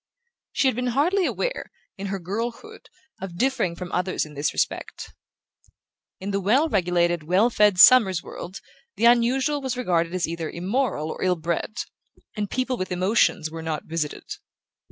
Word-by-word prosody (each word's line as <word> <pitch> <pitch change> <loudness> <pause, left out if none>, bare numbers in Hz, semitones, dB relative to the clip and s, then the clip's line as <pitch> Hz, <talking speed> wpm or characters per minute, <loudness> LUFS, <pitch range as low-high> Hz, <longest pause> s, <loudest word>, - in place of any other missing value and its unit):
She 275 - +2
had 260 - +3
been 250 +1 -2
hardly 360 +6 +2
aware, - - -3 0.3
in 200 +1 -6
her 195 0 -2
girlhood, 230 - -6 0.3
of 185 -3 -7
differing 255 -8 0
from 180 0 -7
others 180 -1 -1
in 150 - -13
this 145 +1 -1
respect. - - -3 1.1
In 195 +2 -4
the 200 0 -1
well 250 - +3
regulated 175 - +1
well 185 +10 +2
fed 210 -4 +3
Summers 190 -4 +7
world 185 +2 -8 0.3
the 230 - +1
unusual 255 +5 +3
was 260 -2 -3
regarded 175 -7 0
as 180 - 0
either 165 -1 -4
immoral 185 - -1
or - - -6
ill 185 -1 +2
bred, 170 +7 -3 0.5
and 210 -2 -3
people 255 0 -1
with 185 - -4
emotions 180 -3 +1
were 165 0 -6
not 160 -1 -3
visited. 160 -2 -3
195 Hz, 160 wpm, -24 LUFS, 170-250 Hz, 1.1 s, Summers